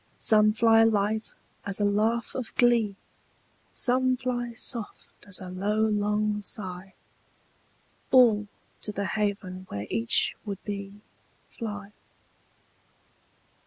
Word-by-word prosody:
Some 215 -1 +5
fly 225 0 +5
light 215 0 +1 0.3
as 200 0 0
a 205 - +2
laugh 220 +3 0
of 255 -3 -6
glee, 235 -5 +3 0.8
Some 255 0 +1
fly 245 -1 -3
soft 230 -1 0 0.2
as 200 - -5
a 185 - -8
low 200 +3 -1
long 210 -1 +1
sigh: 190 -2 -3 1.1
All 225 -5 +5 0.3
to 210 - -4
the 200 0 -3
haven 190 -2 -3
where 100 0 -5
each 115 -1 +1
would 200 -2 -5
be 200 0 -6 0.5
Fly. 205 -3 -7
210 Hz, 110 wpm, -27 LUFS, 200-225 Hz, 1.1 s, Some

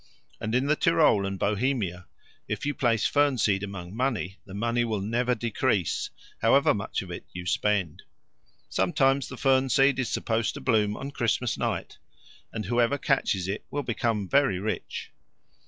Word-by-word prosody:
And 110 +1 -2
in 130 +2 +2
the 150 +2 +3
Tryol 155 - +3
and 95 0 -4
Bohemia 100 -4 -1 0.4
if - - -3
you 145 - 0
place 115 -6 +1
fern 145 -2 +3
seed 100 -3 +2
among 100 -2 -6
money, 115 -7 -2
the 95 - -9
money 115 +3 0
will 110 -3 -1
never 120 +5 0
decrease, 110 -4 0 0.3
however - - +4
much - - -3
of - - -10
it - - -6
you 90 0 -6
spend. 95 -3 0 0.7
Sometimes 135 -4 +2
the 130 - -8
fern 135 0 +3
seed 135 +2 +4
is 125 - -1
supposed 115 +1 -1
to - - -5
bloom 110 -6 +1
on 140 +1 -6
Christmas 120 -2 0
night, - - -3 0.5
and 110 -2 -4
whoever 120 +5 +2
catches 100 -10 0
it 100 +2 -3
will 145 - -2
become 110 -8 -1
very 135 -4 +3
rich. 105 +4 -4
115 Hz, 165 wpm, -27 LUFS, 100-135 Hz, 0.7 s, however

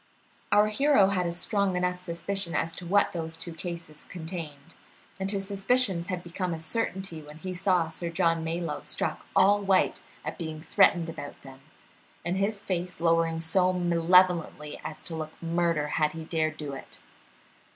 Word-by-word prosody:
Our 210 +1 +5
hero 215 -4 +4
had 180 -3 +1
a - - -1
strong 195 +2 +1
enough 180 0 0
suspicion 180 +1 -4
as 165 - 0
to 175 - -6
what 205 +3 +3
those 160 -1 -4
two 170 +1 -6
cases 165 -2 -6
contained, 160 -5 -7 0.5
and 190 0 -1
his 195 -1 0
suspicions 200 -3 +1
had 180 -3 -3
become 180 0 -3
a - - -7
certainty 190 -2 -2
when 150 0 -12
he 185 +3 -5
saw 180 -2 +2
Sir 170 +1 -4
John 165 0 +1
Malyoe 165 -1 -3
struck - - -2
all 205 +2 +5
white 195 -2 +2 0.2
at - - -5
being 160 -2 -4
threatened 175 0 +4
about 145 -3 -8
them, 135 -1 -12 0.6
and 175 +2 0
his 200 +1 -1
face 180 -2 -3
lowering 165 -1 +2
so 180 +3 +3
malevolently 175 -3 +3
as 155 - -6
to 165 - -5
look 155 -1 -5
murder 165 -2 +1
had 150 0 +1
he 160 0 -6
dared 155 -1 -1
do 145 -2 -5
it. 135 - -9
170 Hz, 170 wpm, -28 LUFS, 160-190 Hz, 0.6 s, Our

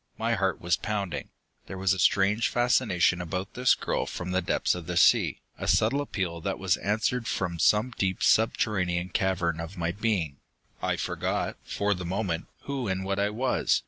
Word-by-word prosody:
My 115 +1 0
heart 95 -3 0
was 85 0 +1
pounding. 100 -4 -3 0.4
There 95 - -6
was 95 0 +2
a 95 - -3
strange 100 +5 +3
fascination 120 -8 +2
about 90 +2 -4
this 125 0 +3
girl - - -2
from 90 +1 -5
the 95 0 +1
depths - - +1
of 90 -1 -7
the 90 -1 -2
sea, - - +4 0.2
a - - -4
subtle 140 +1 +3
appeal 90 -11 -3
that 95 +3 -2
was 95 -1 +1
answered 110 +4 -1
from 85 -3 -2
some 105 +7 +3
deep 95 -2 0
subterranean 90 -5 +2
cavern 85 -3 0
of 85 +4 -7
my 85 0 -1
being. 95 -8 -1 0.4
I - - 0
forgot, - - -2
for 100 0 0
the 90 -2 -6
moment, 90 -2 -2 0.2
who 135 -4 -3
and 95 0 -2
what 100 0 -1
I 100 +1 +2
was. 125 +5 +1
95 Hz, 180 wpm, -27 LUFS, 90-105 Hz, 0.4 s, sea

